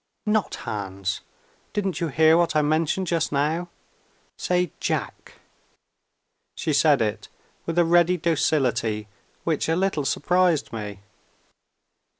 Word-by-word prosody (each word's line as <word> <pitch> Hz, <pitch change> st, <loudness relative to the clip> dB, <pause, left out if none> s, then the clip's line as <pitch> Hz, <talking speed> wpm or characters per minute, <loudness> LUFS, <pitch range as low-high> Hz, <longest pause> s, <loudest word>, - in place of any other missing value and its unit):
"Not 210 Hz, -1 st, +1 dB
Hans! 100 Hz, -2 st, -3 dB, 0.5 s
Didn't 195 Hz, -3 st, -2 dB
you 170 Hz, -, +1 dB
hear 160 Hz, +2 st, +4 dB
what 170 Hz, -1 st, +2 dB
I 150 Hz, -, +4 dB
mentioned 160 Hz, +5 st, +1 dB
just 170 Hz, -2 st, 0 dB
now? 155 Hz, +5 st, 0 dB, 0.7 s
Say 180 Hz, -3 st, 0 dB
Jack." -, -, -3 dB, 1.2 s
She 155 Hz, -, -1 dB
said 145 Hz, -4 st, +4 dB
it, 105 Hz, -1 st, -3 dB, 0.4 s
with 165 Hz, 0 st, -2 dB
a 175 Hz, -, +5 dB
ready 175 Hz, +1 st, +4 dB
docility 130 Hz, -10 st, 0 dB, 0.4 s
which 160 Hz, -1 st, -1 dB
a 165 Hz, -, +2 dB
little 180 Hz, -5 st, 0 dB
surprised 175 Hz, -1 st, +1 dB
me. 105 Hz, -3 st, -6 dB
160 Hz, 120 wpm, -24 LUFS, 135-175 Hz, 1.2 s, a